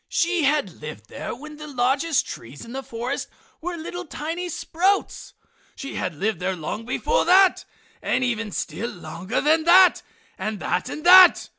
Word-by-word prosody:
She 345 Hz, -2 st, +1 dB
had 280 Hz, -, 0 dB
lived 150 Hz, -8 st, -9 dB
there -, -, -6 dB
when 300 Hz, +4 st, -11 dB
the 300 Hz, 0 st, -9 dB
largest 275 Hz, +3 st, +1 dB
trees 120 Hz, +5 st, -9 dB
in 230 Hz, -, -11 dB
the 270 Hz, +2 st, -4 dB
forest 245 Hz, +2 st, -4 dB, 0.3 s
were 350 Hz, +2 st, -4 dB, 0.3 s
tiny 325 Hz, +3 st, -5 dB
little -, -, -5 dB
sprouts. 375 Hz, +5 st, -1 dB, 0.4 s
She 275 Hz, -, -7 dB
had 180 Hz, -3 st, -3 dB
lived 210 Hz, +7 st, -2 dB
there 185 Hz, +1 st, -2 dB
long 180 Hz, +7 st, -5 dB
before 460 Hz, -, 0 dB
that, 375 Hz, +1 st, +4 dB, 0.4 s
and 260 Hz, -, 0 dB
even 225 Hz, -3 st, -2 dB
still 230 Hz, +4 st, -4 dB
longer 175 Hz, +5 st, -4 dB
than 315 Hz, +2 st, +3 dB
that, 365 Hz, +2 st, +6 dB, 0.4 s
and 215 Hz, -1 st, -3 dB
that, 180 Hz, +3 st, -2 dB
and 305 Hz, -, -7 dB
that. 365 Hz, 0 st, +8 dB
270 Hz, 165 wpm, -23 LUFS, 210-335 Hz, 0.4 s, that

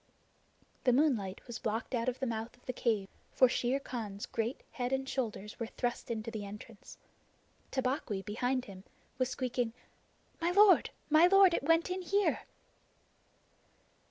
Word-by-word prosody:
The 250 Hz, -, +4 dB
moonlight 240 Hz, -9 st, +1 dB
was 240 Hz, -2 st, -6 dB
blocked 225 Hz, +4 st, -3 dB
out 240 Hz, 0 st, +1 dB
of 250 Hz, -, -5 dB
the 265 Hz, -, -1 dB
mouth 225 Hz, 0 st, -4 dB
of 245 Hz, -, -28 dB
the 255 Hz, -, -3 dB
cave, 220 Hz, -5 st, 0 dB, 0.3 s
for 255 Hz, -, +6 dB
Shere 250 Hz, +2 st, 0 dB
Khan's 215 Hz, -7 st, -5 dB
great 230 Hz, +3 st, -2 dB
square -, -, -32 dB
head 245 Hz, -1 st, -1 dB
and 265 Hz, 0 st, -1 dB
shoulders 220 Hz, -6 st, -4 dB
were 230 Hz, -, -2 dB
thrust 240 Hz, +1 st, -3 dB
into 230 Hz, 0 st, -3 dB
the 215 Hz, -2 st, -5 dB
entrance. 205 Hz, +1 st, -10 dB, 0.7 s
Tabaqui, 255 Hz, -6 st, -1 dB
behind 245 Hz, +4 st, -1 dB
him, 190 Hz, -2 st, -11 dB, 0.4 s
was 255 Hz, -1 st, +1 dB
squeaking: 245 Hz, -3 st, -2 dB, 0.7 s
"My 335 Hz, -, +2 dB
lord, 400 Hz, +2 st, +6 dB, 0.2 s
my 315 Hz, +3 st, +7 dB
lord, 390 Hz, -1 st, +6 dB
it -, -, +1 dB
went 330 Hz, +4 st, +2 dB
in 370 Hz, +1 st, -2 dB
here!" 400 Hz, +3 st, +1 dB
245 Hz, 155 wpm, -32 LUFS, 220-270 Hz, 0.7 s, my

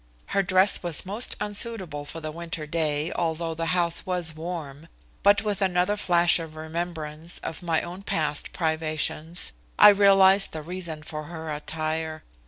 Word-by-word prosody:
Her 200 Hz, -, +4 dB
dress 190 Hz, +1 st, +4 dB
was 175 Hz, -1 st, +2 dB
most 210 Hz, +6 st, -3 dB
unsuitable 205 Hz, -7 st, -1 dB
for 165 Hz, -, -7 dB
the 155 Hz, -1 st, -4 dB
winter 165 Hz, -1 st, -6 dB
day, 155 Hz, 0 st, -1 dB
although 165 Hz, 0 st, -2 dB
the 165 Hz, +1 st, -3 dB
house 170 Hz, -1 st, +1 dB
was 180 Hz, -4 st, 0 dB
warm, 160 Hz, -2 st, -7 dB, 0.3 s
but 200 Hz, +1 st, +4 dB
with 210 Hz, -2 st, -2 dB
another 185 Hz, +1 st, +2 dB
flash 175 Hz, -4 st, +3 dB
of 160 Hz, -1 st, -8 dB
remembrance 160 Hz, 0 st, -5 dB
of 165 Hz, -, -5 dB
my 165 Hz, -2 st, 0 dB
own 180 Hz, +3 st, -7 dB
past 150 Hz, -6 st, -1 dB
privations, 160 Hz, 0 st, -2 dB, 0.2 s
I 210 Hz, -, +10 dB
realized 195 Hz, -1 st, +5 dB
the 155 Hz, -1 st, -5 dB
reason 170 Hz, -2 st, -5 dB
for 155 Hz, -1 st, -6 dB
her 160 Hz, 0 st, -6 dB
attire. 155 Hz, +1 st, -4 dB
165 Hz, 155 wpm, -26 LUFS, 155-185 Hz, 0.3 s, I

